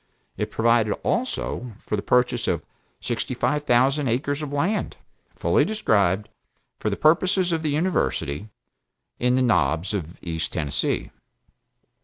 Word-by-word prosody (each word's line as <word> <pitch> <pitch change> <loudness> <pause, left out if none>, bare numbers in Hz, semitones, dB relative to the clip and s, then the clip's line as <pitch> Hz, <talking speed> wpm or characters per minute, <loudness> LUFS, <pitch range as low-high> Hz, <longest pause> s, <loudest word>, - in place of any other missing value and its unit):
It - - -2
provided 115 -2 +3
also 180 - -2
for - - -3
the 100 - -2
purchase 125 0 +2
of 85 -3 -1 0.4
sixty - - -2
five 150 0 0
thousand 135 +4 +3
acres 140 +5 0
of 150 -2 -4
land, 175 +9 -1 0.4
(fully - - +3
described) 105 - +1 0.5
for - - -1
the - - -2
purposes 180 +3 +3
of 165 -1 0
the 155 - -1
University, 110 - -1 0.7
in 125 +1 +2
the 130 - +3
Knobs 90 - +2
of 85 -4 -4
East 80 -2 -3
Tennessee. 75 -3 -1
125 Hz, 135 wpm, -24 LUFS, 100-150 Hz, 0.7 s, provided